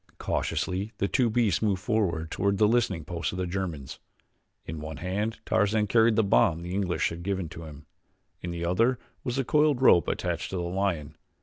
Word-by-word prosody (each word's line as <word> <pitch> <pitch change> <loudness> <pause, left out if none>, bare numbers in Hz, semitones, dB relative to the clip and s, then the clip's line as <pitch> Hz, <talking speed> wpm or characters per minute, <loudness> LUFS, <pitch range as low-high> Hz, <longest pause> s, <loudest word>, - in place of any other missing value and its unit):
Cautiously 100 +4 -2
the 100 - 0
two 125 +2 +2
beasts 110 -4 +1
moved 100 -4 +1
forward 85 -8 0
toward 100 +1 0
the 105 +1 +4
listening 105 -8 +1
post 85 0 -3
of - - -5
the 90 - -1
Germans. 85 -7 -4 0.7
In 80 - -6
one 75 0 -6
hand 105 +7 -2
Tarzan 105 0 +2
carried 115 +2 +4
the 110 - +3
bomb 85 -4 +3
the 90 +1 -5
English 95 -3 0
had 85 +1 -7
given 95 -1 -2
him, 80 -3 -10 0.6
in 90 - -5
the 85 0 -3
other 115 +9 +2 0.3
was 125 - -2
the 135 -1 0
coiled 150 -1 +3
rope 90 - +5
attached - - -2
to - - -5
the 90 - -2
lion. 85 -4 -2
95 Hz, 190 wpm, -27 LUFS, 85-110 Hz, 0.7 s, rope